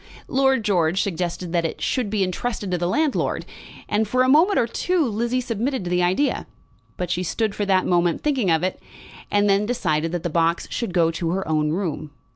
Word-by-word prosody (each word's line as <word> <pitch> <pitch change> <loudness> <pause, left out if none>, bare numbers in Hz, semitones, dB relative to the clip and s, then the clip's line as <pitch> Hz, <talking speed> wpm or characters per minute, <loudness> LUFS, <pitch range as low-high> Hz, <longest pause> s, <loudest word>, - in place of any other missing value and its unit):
Lord 265 -2 +2
George 180 -3 +2
suggested 175 -1 -2
that 170 -1 +2
it 165 - -3
should 250 -6 -1
be 205 -2 +1
entrusted 200 +1 -3
to 180 - +1
the 175 - 0
landlord; 300 - 0 0.4
and 210 +1 +1
for 255 +4 +2
a - - +2
moment 325 +9 +5
or - - +3
two 335 +8 0
Lizzie 235 +2 -1
submitted 245 0 -2
to 175 - -4
the 180 0 +2
idea. 185 +11 +1 0.5
But 180 -1 -3
she 180 - 0
stood 200 +5 -1
for 205 -1 -2
that 190 -1 +3
moment 175 -1 +1
thinking 270 -10 +1
of 160 +1 +2
it, 185 - -2 0.5
and 205 0 +2
then 200 +1 +2
decided 165 -9 0
that 175 - -2
the 175 - -1
box 165 +1 +1
should 210 -7 -3
go 165 -2 +3
to 165 0 -3
her 190 +3 -2
own 155 -1 +1
room. 155 -3 -3
190 Hz, 210 wpm, -23 LUFS, 175-235 Hz, 0.5 s, moment